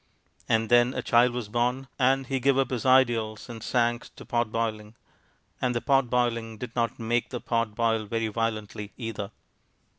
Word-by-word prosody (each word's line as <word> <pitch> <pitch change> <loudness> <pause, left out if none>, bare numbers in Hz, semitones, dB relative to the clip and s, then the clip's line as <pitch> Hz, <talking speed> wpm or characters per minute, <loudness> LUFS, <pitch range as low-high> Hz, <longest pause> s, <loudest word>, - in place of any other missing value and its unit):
And 115 0 +2
then 120 +1 +4
a 125 - -2
child 120 +1 +4
was 120 -3 -4
born; 125 +4 -1
and 135 +1 +3
he 135 +1 -1
gave 135 +1 +3
up 135 -2 +1
his 125 0 -2
ideals 120 -4 +3
and 115 -2 -8
sank 120 0 0
to - - -11
pot 120 -2 0
boiling, 110 -1 -3 0.7
and 125 -1 0
the - - +2
pot 135 -3 +2
boiling 115 -2 0
did 120 +1 -7
not 115 0 0
make 120 +1 -1
the 125 - -4
pot 115 -2 -1
boil 115 -1 +1
very 115 +1 -1
violently, 110 -2 -3
either. 115 -4 -5
120 Hz, 180 wpm, -27 LUFS, 115-125 Hz, 0.7 s, then